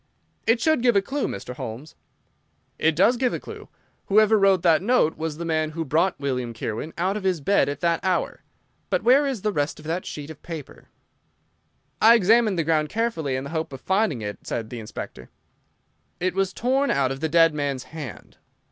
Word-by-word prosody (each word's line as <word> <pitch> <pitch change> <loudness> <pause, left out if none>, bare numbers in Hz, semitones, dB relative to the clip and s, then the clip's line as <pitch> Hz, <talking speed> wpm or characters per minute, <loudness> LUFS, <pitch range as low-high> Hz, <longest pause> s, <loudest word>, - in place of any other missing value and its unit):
"It 230 +1 +4
should 315 0 +2
give 240 -2 +3
a 200 - +5
clue, 275 +7 -2
Mr. 100 +5 -6
Holmes." 125 +8 -7 0.9
"It 160 0 +2
does 215 +9 +4
give 250 0 +1
a - - -4
clue. - - -10 0.4
Whoever 215 +2 +5
wrote 195 -3 +4
that 165 -2 +4
note 205 -7 +2
was 160 -1 -4
the 170 - -5
man 155 -1 0
who 165 - -2
brought 165 +6 +1
William 125 -4 -3
Kirwan 115 +8 -4
out 185 +4 0
of 210 - -6
his 185 -3 +1
bed 175 +2 +2
at 145 - -5
that 170 -1 +2
hour. 185 -2 -1 0.5
But - - 0
where 270 +4 +5
is 255 -8 -3
the 210 - +1
rest 145 -2 -1
of 155 - -13
that 170 +3 -3
sheet 150 +1 -7
of 155 - -13
paper?" 165 -5 -9 1.1
"I 230 +2 +8
examined 220 -1 +3
the 165 - +1
ground 155 -1 +1
carefully 215 - -1
in 130 - -3
the 140 - -7
hope 160 -2 -3
of 135 - -7
finding 190 - 0
it," 105 0 -5
said 110 -2 -5
the 120 - -5
Inspector. 65 - -8 0.9
"It 185 +1 0
was 195 0 0
torn 265 +7 0
out 135 -2 +1
of 135 - -5
the 160 +2 -1
dead 165 0 +5
man's 140 -3 -2
hand. 135 - -9
165 Hz, 200 wpm, -24 LUFS, 145-205 Hz, 1.1 s, I